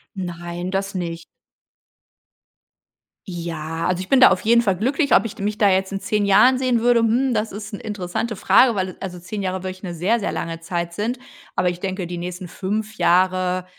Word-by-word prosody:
Nein, 175 -1 -5
das 195 0 -2
nicht. 170 -2 -4 2.0
Ja, 165 -2 -4
also 180 0 0
ich 185 - -8
bin 270 - +5
da - - +10
auf 185 - +1
jeden 235 +2 +4
Fall 195 -5 0
glücklich. 275 - +1
Ob - - +4
ich 225 - -5
d 200 - -7
mich 210 +1 -1
da 205 -3 +4
jetzt 190 0 +1
in 195 - -3
10 210 0 0
Jahren 250 +6 +5
sehen 255 -2 +1
würde, 240 0 +4
hm, 245 +3 +2
das 215 0 -1
ist 210 +1 -8
'ne - - -5
interessante 210 +1 -3
Frage, 240 +4 +4
weil, 185 -2 -2
also, 180 -2 -6
10 190 +4 -6
Jahre 185 0 -2
wirklich 185 +1 -6
'ne 175 - -5
sehr, 190 +8 +1
sehr 205 - -2
lange 165 0 -4
Zeit 170 0 -3
sind. 230 +7 -2 0.4
Aber 180 -1 +2
ich 175 0 -5
denke, 190 -2 -3
die 175 - -5
nächsten 180 +1 -6
5 210 +5 -4
Jahre, 185 0 +2
190 Hz, 205 wpm, -21 LUFS, 180-215 Hz, 2.0 s, da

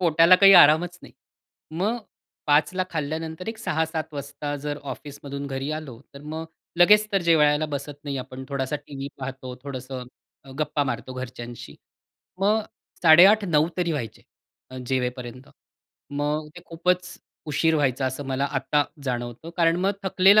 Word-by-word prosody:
पोटाला 170 +1 +6
काही 195 +1 +8
आरामच 175 +2 +6
नाही. - - -13 0.6
मग 195 +9 -1 0.5
5:00 150 +3 +3
ला 185 0 0
खाल्ल्यानंतर 160 +3 -4
एक 225 0 -5
6:00-7:00 160 -5 -2
वाजता 145 +1 -5
जर 145 0 -3
ऑफिसमधून 140 -1 -8
घरी 135 +1 -4
आलो, 150 -7 -7
तर 140 - -11
मग 155 +2 -5 0.3
लगेच 210 +4 +6
तर 195 -2 +2
जेवायला 155 -2 +4
बसत 145 0 -6
नाही 140 -2 -3
आपण. 130 +1 -8
थोडासा 140 0 -2
टीव्ही 140 -1 -8
पाहतो 130 -1 -6
थोडंसं 130 -2 -6 0.4
अ, 135 - -13
गप्पा 150 -1 0
मारतो 125 0 -4
घरच्यांशी. 120 -2 -8 0.6
मग 210 +3 +3 0.4
8:30-9:00 170 -2 +6
तरी 175 -2 0
व्हायचे 120 -8 -5 0.5
अ, 130 - -9
जेवेपर्यंत. 125 -1 -3 0.6
मग 150 +2 -2
ते - - -8
खूपच 180 +2 -1 0.3
उशीर 160 +2 +2
व्हायचा 135 -3 +1
असं 130 +2 -4
मला 135 +1 -1
आता 140 +2 +1 0.2
जाणवतं. 120 +4 -4
कारण 165 -1 +3
मग 195 +2 +2
थकलेलं 195 +2 +5
150 Hz, 145 wpm, -24 LUFS, 135-165 Hz, 0.6 s, काही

